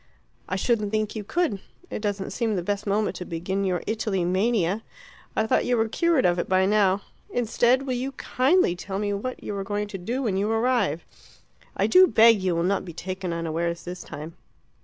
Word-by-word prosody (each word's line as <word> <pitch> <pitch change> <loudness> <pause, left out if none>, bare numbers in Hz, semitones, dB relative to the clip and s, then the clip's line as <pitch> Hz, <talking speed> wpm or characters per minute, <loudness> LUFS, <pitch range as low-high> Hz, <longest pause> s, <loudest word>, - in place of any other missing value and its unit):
"I 185 - -1
shouldn't 210 +1 +1
think 215 0 -1
you 215 - -4
could. 295 - 0 0.3
It - - -4
doesn't 205 -2 -2
seem 225 -3 -1
the 180 - -2
best 205 +2 -2
moment 205 +1 0
to - - -5
begin 185 +4 -2
your 185 -2 -1
Italy 215 -5 -1
mania. 195 +1 +1 0.5
I 220 - +2
thought - - +2
you 245 -1 +1
were 225 0 +2
cured 335 +4 +2
of 175 0 +3
it - - -2
by 185 0 +4
now. 200 -1 +3 0.3
Instead, 245 +2 +2
will 260 - -1
you 260 +2 -3
kindly 260 - +2
tell 190 +2 -5
me 205 0 -1
what 250 +6 -4
you 205 - -4
are 195 - -3
going 205 +1 -2
to 195 - -6
do 240 +9 -3
when 200 -6 0
you 205 +2 0
arrive. 225 - +1 0.7
I - - +2
do 370 0 +7
beg 225 - +6
you 185 -2 0
will 170 - 0
not 195 +2 +1
be 175 - -8
taken 185 +1 -4
unawares 170 +1 -2
this 180 0 -6
time." 155 +3 -8
205 Hz, 205 wpm, -25 LUFS, 185-230 Hz, 0.7 s, do